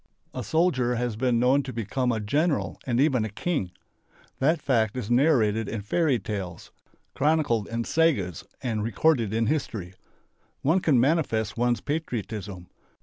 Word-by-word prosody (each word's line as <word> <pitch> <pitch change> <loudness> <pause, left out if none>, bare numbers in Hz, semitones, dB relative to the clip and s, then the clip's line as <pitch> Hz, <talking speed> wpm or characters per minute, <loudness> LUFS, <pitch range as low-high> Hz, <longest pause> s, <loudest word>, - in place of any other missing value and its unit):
A - - -4
soldier 135 -8 +1
has 120 -2 -2
been 125 +1 +1
known 130 +4 +3
to 135 - -6
become 125 +2 -1
a 115 - -1
general 145 +10 0
and 120 -1 +1
even 135 -5 +3
a 110 - -3
king. 110 - -2 0.7
That 155 +4 +2
fact 115 -5 +1
is 120 -2 -4
narrated 115 -6 +3
in 110 -2 -3
fairy 145 +4 +1
tales, 95 -5 -6 0.4
chronicled 145 -7 +1
in 115 0 -2
sagas 115 - +1 0.2
and 115 -4 -1
recorded 115 0 +2
in 115 +1 +1
history. 110 - -2 0.7
One 160 +7 +3
can 150 -8 +3
manifest 125 - +1
one's 120 0 +1
patriotism. 105 - -4
120 Hz, 145 wpm, -26 LUFS, 110-145 Hz, 0.7 s, known